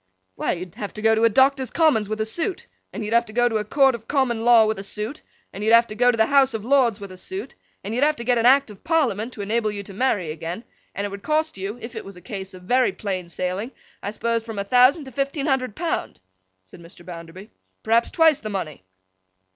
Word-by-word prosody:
'Why, - - -1
you'd 180 -1 -7
have 205 - -7
to 215 - -6
go 225 0 +5
to 225 +1 +4
Doctors' 265 +2 +3
Commons 275 -11 +2
with 215 0 -3
a - - 0
suit, 340 - -2 0.3
and 215 - -5
you'd 210 - -3
have 235 0 +3
to 215 - -11
go 240 +1 +3
to 225 -2 0
a 210 - -1
court 270 +5 +3
of 230 -2 -8
Common 255 -5 0
Law 235 -2 +6
with 215 -1 -1
a - - -6
suit, 215 +8 -5 0.3
and 200 - -6
you'd 220 +2 +6
have 230 0 +6
to 215 - -8
go 245 +3 +4
to 240 - +1
the 220 - +4
House 270 -1 +3
of 215 -1 -5
Lords 250 -5 +3
with 200 -2 -9
a 185 - -11
suit, 380 - -7 0.3
and 210 - -5
you'd 250 +4 +1
have 305 +1 +3
to 235 - -6
get 245 0 +2
an 230 - +4
Act 270 -2 +4
of 200 - -15
Parliament 255 - 0
to 210 - -7
enable 215 +1 0
you 200 -1 -5
to 195 - -11
marry 200 -7 0
again, 165 +6 -6 0.3
and 200 - -2
it 205 - -5
would 200 0 -7
cost 310 +3 0
you 195 +4 -5
(if 230 +1 -8
it 220 - -5
was 195 -2 -11
a - - -10
case 190 +1 -7
of 180 - -13
very 250 +6 +2
plain 185 -4 -4
sailing), 185 +6 -3 0.3
I - - -4
suppose 230 +2 -1
from 225 -1 -8
a 200 - -1
thousand 255 - +4
to 265 - -10
fifteen 275 +2 -2
hundred 255 -6 0
pound,' 330 - -3 0.4
said 95 - -15
Mr. 170 +1 -15
Bounderby. 175 +4 -10 0.3
'Perhaps 230 +2 +2
twice 320 -3 +4
the 215 - -6
money. 165 - -5
225 Hz, 255 wpm, -23 LUFS, 200-260 Hz, 0.4 s, Law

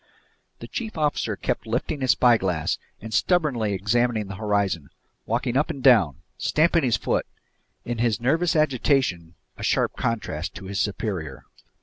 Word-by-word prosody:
The - - -7
chief 220 -6 -5
officer 145 -8 0
kept 120 +2 -3
lifting 130 +6 -2
his 130 - -1
spyglass 95 -12 +3 0.2
and 110 +2 -7
stubbornly 130 - +1
examining 110 +2 0
the 95 - -5
horizon, 100 -7 -1 0.4
walking 120 +2 -1
up 145 +3 +2
and 135 - -5
down, 95 - +4 0.2
stamping 165 +2 +3
his 120 -6 +2
foot, - - -1 0.6
in 120 -1 -3
his 115 -3 +1
nervous 165 +9 +1
agitation 130 - +1 0.2
a - - -6
sharp - - +1
contrast 100 -9 -3
to 95 +3 -8
his 100 +1 -3
superior. 95 - -3
115 Hz, 145 wpm, -24 LUFS, 95-135 Hz, 0.6 s, down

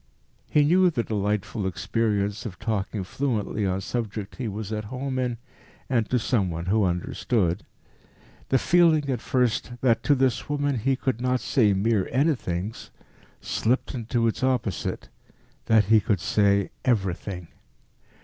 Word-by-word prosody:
He 150 - +4
knew 180 +5 +5
the 120 -8 -1
delightful 105 -1 -1
experience 105 +1 -1
of 100 -7 -7
talking 105 -2 -2
fluently 105 -2 -1
on 95 +1 -1
subjects 110 -2 -4
he 125 - -2
was 105 +1 -5
at 105 0 -3
home 130 +3 -3
in, 125 -2 -1 0.5
and 115 -4 +1
to 125 - +2
some 110 -5 +1
one 85 0 -4
who 105 +2 +2
understood. 90 +2 0 0.9
The 135 - +4
feeling 160 -1 +3
at 125 -4 -2
first 125 -1 0
that 115 -3 +3
to 145 - +3
this 130 -1 0
woman 145 -3 0
he 135 +5 +1
could 130 -2 -2
not 125 0 +1
say 105 0 +2
mere 100 0 +1
anythings, 115 - -1 0.5
slipped 125 +6 0
into 120 -1 -1
its 115 - -2
opposite 125 -6 -1 0.6
that 110 -2 +5
he 110 +3 +5
could 100 -2 0
say 100 +1 +2
everything. 95 -5 -1
110 Hz, 145 wpm, -25 LUFS, 100-130 Hz, 0.9 s, knew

